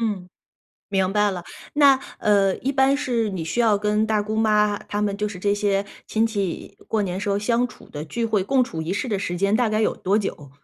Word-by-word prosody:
嗯， 205 -5 -2 0.6
明 190 -1 +1
白 210 -1 +3
了。 180 -2 -6 0.3
那， 280 -2 +6 0.2
呃， 200 -2 +3
一 275 - -1
般 270 0 +3
是 235 -6 -1
你 180 -4 -4
需 165 +9 -1
要 220 -3 +4
跟 210 +1 +1
大 215 -1 +1
姑 215 +1 -3
妈 210 -2 +3
她 205 - -3
们 200 -1 0
就 210 +1 -1
是 200 -3 -8
这 200 +2 +1
些 205 -1 0 0.2
亲 220 +1 +1
戚 200 -5 -4
过 220 -1 +1
年 185 -1 -3
时 205 - -3
候 200 0 +1
相 235 +4 +1
处 - - -16
的 150 0 -6
聚 230 +9 -3
会， 220 -3 +1
共 260 +6 +2
处 160 -9 -5
一 165 +3 -3
室 205 +5 -2
的 205 -4 0
时 175 -3 -3
间 200 +3 +1
大 240 -2 +2
概 215 0 0
有 - - +1
多 200 +3 +1
久？ 150 -8 -5
210 Hz, 255 characters per minute, -23 LUFS, 195-225 Hz, 0.6 s, 那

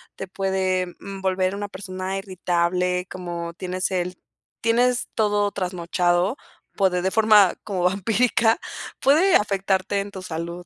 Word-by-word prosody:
te 195 - -6
puede, 185 -1 0
mm, 195 0 -8
volver 185 0 0
una 205 0 -4
persona 190 -1 -5
irritable, 180 -1 0
como 170 -2 -5
tienes 185 +1 -3
el 180 -1 -2 0.4
tienes 245 +2 +2
todo 205 -2 +1
trasnochado 180 +2 0 0.4
por 195 -1 +4
de 180 +1 0
forma 215 -4 +5
como 190 -4 -2
vampírica 225 +4 +2 0.4
puede 315 +8 +5
afectarte 195 -1 +1
en 200 +1 -4
tu 190 - -8
salud. 170 0 -6
190 Hz, 130 wpm, -23 LUFS, 180-205 Hz, 0.4 s, forma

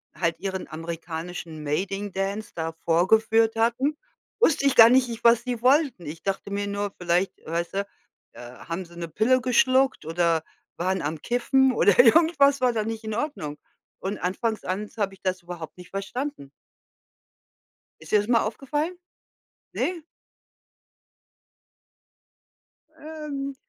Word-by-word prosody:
halt 165 -2 -1
ihren 190 -1 -4
amerikanischen 165 0 -6
Mating-Dance 195 +5 -3
da 165 -1 -3
vorgeführt 220 +6 +3
hatten, 240 +6 +1 0.4
wusste 320 -11 +3
ich 275 - +2
gar 230 0 +10
nicht 250 0 +4
ich 230 -1 -7
was 235 0 +5
sie 245 -2 -4
wollten. 260 - +3
Ich 155 +2 -7
dachte 195 +1 -3
mir 200 0 -2
nur, 200 0 -3
vielleicht, 180 +2 +1
weißt 170 +1 -3
du, 200 0 -1 0.5
äh, - - -11
haben 165 +9 -7
sie 170 - -16
'ne 170 -1 -4
Pille 225 +10 +2
geschluckt 260 - +2
oder 165 0 +1 0.3
waren 185 +2 -1
am 150 +1 -3
Kiffen 260 +2 +2
oder 205 -5 +3
irgendwas 280 +1 +5
war 250 -1 +3
da 220 -2 0
nicht 225 +1 -5
in 220 -1 -3
Ordnung 220 - -4 0.4
und 200 +2 -3
anfangs 220 +5 -2
ans 205 +4 -4
habe 200 -2 -1
ich - - -28
das 185 -1 -2
überhaupt 170 -2 -8
nicht 180 -1 -12
verstanden. 200 - -5 1.5
Ist 160 - -12
dir 215 - +6
das 205 - -3
mal 235 -1 +4
aufgefallen? 295 +10 -3 0.8
Ne? 355 -2 -2 3.0
Ähm, 295 -3 -6
205 Hz, 140 wpm, -25 LUFS, 175-250 Hz, 3.0 s, gar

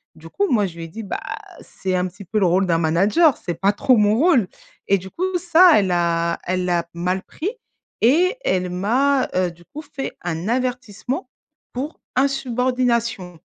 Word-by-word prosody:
Du 165 +1 -13
coup, 405 0 0
moi 210 -5 +3
je 170 - -11
lui 165 - -6
ai - - -8
dit: 220 +7 -8
«Bah 195 - -4 0.4
c'est 185 -1 -4
un 180 0 +1
petit 200 +3 -11
peu 215 +4 -1
le 190 - +3
rôle 185 +2 +2
d'un 165 -1 +2
manager, 200 - +3
c'est 175 -3 -5
pas 200 +1 +3
trop 250 +3 +3
mon 210 0 +3
rôle» 270 - +3 0.4
et 195 - +4
du 190 +1 -10
coup 370 - -2
ça, 350 0 +6
elle 190 -2 0
a 170 -1 0
elle 185 0 -1
l'a 170 -1 0
mal 180 +3 -2
pris 360 +6 -4 0.5
et 350 - +3
elle 180 -1 0
m'a, 255 +9 +1
heu, 180 -2 +1
du 170 0 -19
coup 305 - -9
fait 285 -2 -6
un 175 +2 -4
avertissement 250 0 -3 0.4
pour 275 +5 -5 0.2
insubordination. 245 -7 0
205 Hz, 185 wpm, -21 LUFS, 180-265 Hz, 0.5 s, ça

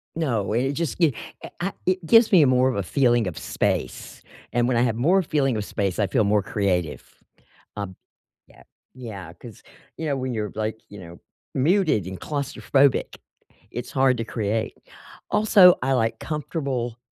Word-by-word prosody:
No, 115 -11 -1
and 120 - +1
it 140 - -1
just 165 -1 -3
gi 160 -6 +3 0.3
a - - -7
I 190 +2 -2
it 185 -1 0
gives 225 +6 +5
me 165 -7 +7
more 130 0 +3
of 130 - -2
a 100 - -1
feeling 120 +2 +2
of 90 - -5
space, 65 - -3 0.3
and 120 0 +2
when 125 - +1
I - - +3
have 115 -3 +1
more 175 +11 +3
feeling 140 -8 0
of 105 - -3
space, 100 -2 -2
I 105 - +2
feel 105 - +1
more 105 0 +2
creative. 90 -5 -1 0.8
Um 100 -2 -5 0.5
Yeah. - - -19 0.3
Yeah, 100 -10 -9
'cause, 110 +5 -13 0.3
you 160 - -4
know, 145 -2 0
when 130 -1 -3
you're, 105 -2 -3
like, 110 +1 -3
you 100 - -11
know, 85 -1 -12 0.3
muted 155 - +2
and 95 -1 -7
claustrophobic, 140 -1 0 0.5
it's 120 - -6
hard 130 -2 +2
to 115 - -3
create, 110 0 -2 0.5
also, 195 -4 +6
I 135 +1 +1
like 115 -3 0
comfortable, 135 -6 -3
120 Hz, 175 wpm, -24 LUFS, 105-145 Hz, 0.8 s, me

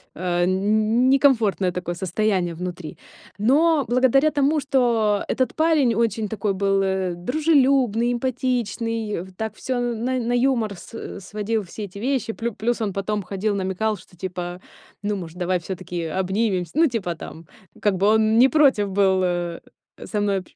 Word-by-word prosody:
э, 175 0 0
не 185 - +1 0.2
не 220 +4 +3
некомфортное 220 -9 +2
такое 175 -1 -4
состояние 185 -1 -1
внутри. 175 -2 -6 0.4
Но 290 +5 +3
благодаря 260 +5 +3
тому, 290 +2 +2
что 235 -7 +2
этот 255 - 0
парень 310 -6 +3
очень 225 -1 0
такой 210 -1 -1
был, 195 0 +1
э, 190 -2 -1
дружелюбный, 255 - +2
эмпатичный, 235 -4 -2
в 190 0 -14
так 220 0 -4
всё 255 +1 -3
на 245 +1 -1
на 240 0 -1
юмор 245 -4 +1
с 230 - -8
сводил, 210 +3 -2
все 200 +4 -8
эти 200 +1 -10
вещи. 250 -2 -1
Плю 235 +1 -3
плюс, 230 +3 -1
он 205 -3 -1
потом 205 +2 -2
ходил, 200 +2 -2
намекал, 195 +3 -1
что 180 0 -19
типа, 180 -1 -5 0.4
ну, 205 0 -1
может, 170 -2 -8
давай 180 0 0
всё-таки 175 -1 -5
обнимемся? 190 +1 -1
Ну, 325 +1 +5
типа 205 - -3
там, 165 0 -10 0.3
как 205 -3 +1
бы 195 +2 +2
он 220 +1 +4
не 260 +2 +7
против 265 -10 +3
был, 190 -1 +3
э, 175 -1 -1 0.5
со 210 - -2
мной 200 -1 +1
общ 185 - -16
215 Hz, 165 wpm, -23 LUFS, 185-245 Hz, 0.5 s, не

